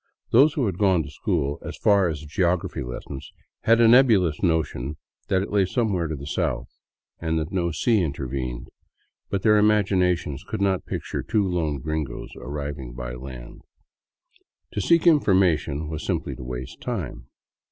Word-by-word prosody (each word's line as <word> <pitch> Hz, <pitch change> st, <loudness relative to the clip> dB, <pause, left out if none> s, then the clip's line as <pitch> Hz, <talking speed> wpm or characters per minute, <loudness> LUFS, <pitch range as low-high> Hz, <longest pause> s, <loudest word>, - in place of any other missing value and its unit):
Those 140 Hz, +6 st, +6 dB
who 135 Hz, -, +1 dB
had 95 Hz, -4 st, -2 dB
gone 95 Hz, -5 st, +3 dB
to 70 Hz, -, -9 dB
school 75 Hz, -4 st, -1 dB
as -, -, -7 dB
far 100 Hz, -3 st, +4 dB
as 80 Hz, -3 st, -3 dB
the -, -, -10 dB
geography 85 Hz, +3 st, 0 dB
lessons 65 Hz, +2 st, -7 dB, 0.3 s
had 115 Hz, +1 st, +5 dB
a 115 Hz, -, +6 dB
nebulous 110 Hz, -, +5 dB
notion 80 Hz, -5 st, 0 dB, 0.3 s
that 95 Hz, -1 st, +2 dB
it -, -, -7 dB
lay 100 Hz, -1 st, +3 dB
somewhere 95 Hz, -4 st, 0 dB
to 80 Hz, -, -3 dB
the 70 Hz, 0 st, -8 dB
south, 70 Hz, -6 st, -1 dB, 0.5 s
and 80 Hz, -1 st, -1 dB
that 80 Hz, 0 st, -2 dB
no 90 Hz, -2 st, 0 dB
sea 105 Hz, +7 st, +2 dB
intervened; 65 Hz, -5 st, -4 dB, 0.6 s
but 100 Hz, -2 st, -2 dB
their 105 Hz, -1 st, +5 dB
imaginations 90 Hz, -8 st, +2 dB
could 110 Hz, -, -5 dB
not 95 Hz, -2 st, 0 dB
picture -, -, -3 dB
two 105 Hz, -3 st, +1 dB
lone 80 Hz, -5 st, -1 dB
gringos 75 Hz, +1 st, -4 dB
arriving 70 Hz, -4 st, -5 dB
by -, -, -5 dB
land. 60 Hz, -1 st, -9 dB, 1.1 s
To 105 Hz, -, -2 dB
seek 170 Hz, -, +3 dB
information 95 Hz, -, +3 dB
was 80 Hz, 0 st, -5 dB
simply -, -, -2 dB
to -, -, -9 dB
waste 60 Hz, 0 st, -7 dB
time. -, -, -4 dB
85 Hz, 165 wpm, -24 LUFS, 70-100 Hz, 1.1 s, Those